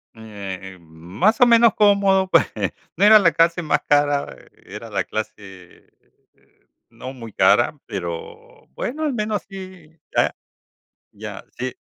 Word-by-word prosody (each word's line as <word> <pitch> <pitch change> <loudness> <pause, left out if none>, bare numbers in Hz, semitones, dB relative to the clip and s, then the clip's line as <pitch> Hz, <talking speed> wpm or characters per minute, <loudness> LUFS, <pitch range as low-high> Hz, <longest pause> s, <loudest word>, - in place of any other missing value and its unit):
Eh, 100 -4 -9
más 85 - -2
o 250 - +9
menos 235 -1 +5
cómodo, 200 -2 +3
pues - - +4 0.5
no - - 0
era 215 +1 +8
la 170 -4 +4
clase 170 +1 +2
más 150 -2 0
cara. 145 -1 +1 0.3
Era - - -9
la - - -1
clase 95 -4 -9 1.0
no 120 +2 -9
muy 115 -5 -11
cara 120 +9 +3
pero, 85 -4 -8
bueno, 270 - -5
al 295 - -1
menos 210 -3 -2
sí, 185 -5 -12 0.2
ya - - +2 0.8
ya, - - -9
sí, 130 0 -4
150 Hz, 130 wpm, -21 LUFS, -, 1.0 s, o